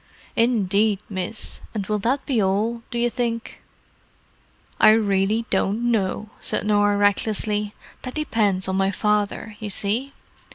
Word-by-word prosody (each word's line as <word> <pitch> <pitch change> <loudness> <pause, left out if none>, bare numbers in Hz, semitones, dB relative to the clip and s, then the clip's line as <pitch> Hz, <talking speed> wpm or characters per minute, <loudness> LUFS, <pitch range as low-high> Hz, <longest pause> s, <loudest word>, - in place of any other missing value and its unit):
"Indeed, 215 -3 +2
miss. 190 +3 -5
And 205 -3 -2
will 210 +1 -1
that 260 +7 0
be 245 -6 +1
all, 210 +5 0
do 240 - -4
you 240 0 +2
think?" 230 0 -3 1.2
"I 215 - +8
really 210 +1 +1
don't 210 +5 +1
know," 210 0 -1
said - - 0
Norah 205 -1 +3
recklessly. 210 +1 +1 0.3
"That 255 - -7
depends 210 -11 0
on 190 0 -1
my 195 0 +2
father, 210 +2 -1
you 215 -2 -5
see." 225 +8 -1
210 Hz, 135 wpm, -23 LUFS, 200-230 Hz, 1.2 s, I